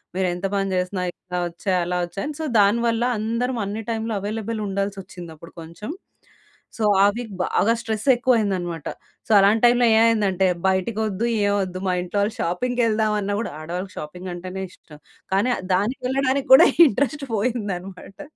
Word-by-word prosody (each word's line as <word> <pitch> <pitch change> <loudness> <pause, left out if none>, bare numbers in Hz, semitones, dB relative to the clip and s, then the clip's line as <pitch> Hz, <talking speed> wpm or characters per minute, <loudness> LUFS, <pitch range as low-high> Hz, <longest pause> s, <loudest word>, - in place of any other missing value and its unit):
మీరేంత 185 0 -1
పని 195 0 0
చేసినా 180 +1 -1
ఇట్లా 180 0 -8
ఒచ్చాయి, 185 +2 -2
అలా 180 +1 -2
ఒచ్చాయని 195 - -5
సో 315 - -2
దానివల్ల 230 +3 +2
అందరం 230 +4 -2
అన్ని 210 +3 -4
టైమ్‌లో 225 0 -2
అవైలబుల్ 215 +2 -4
ఉండాల్సొచ్చింది 195 -3 -5
అప్పుడు 165 +2 -14
కొంచెం. 170 - -8 0.9
సో 225 - -2 0.2
ఆ - - +7
వీక్ 235 -2 -6
బాగా 225 - +2
స్ట్రెస్ 220 -1 -4
ఎక్కువ 245 +1 +2
అయిందన్నమాట. 175 -6 -2 0.4
సో - - -4
అలాంటైమ్‌లో 235 +4 +4
ఏమైందంటే 210 -5 +3 0.2
బయటికొద్దు, 210 +3 -1 0.2
ఏమొద్దు. 190 -3 -1
మా 180 - +1
ఇంట్లో 180 +3 -3
వాళ్ళు 210 +2 -1
షాపింగ్‌కేళ్దామన్నా 215 0 0
గూడా 230 - -5
ఆడవాళ్ళకి 180 +4 -6
షాపింగ్ 180 +5 -7
అంటేనే 185 +2 -6
ఇష్టం. 150 -4 -17 0.3
కానీ 205 +6 +2
అద్ 185 - -8
దానికేళ్ళడానికి 260 +6 -1
గూడా 265 - +9 0.2
ఇంట్రెస్ట్ 280 +4 -1
పోయిందన్నమాట. 200 -4 -4
205 Hz, 140 wpm, -22 LUFS, 185-230 Hz, 0.9 s, గూడా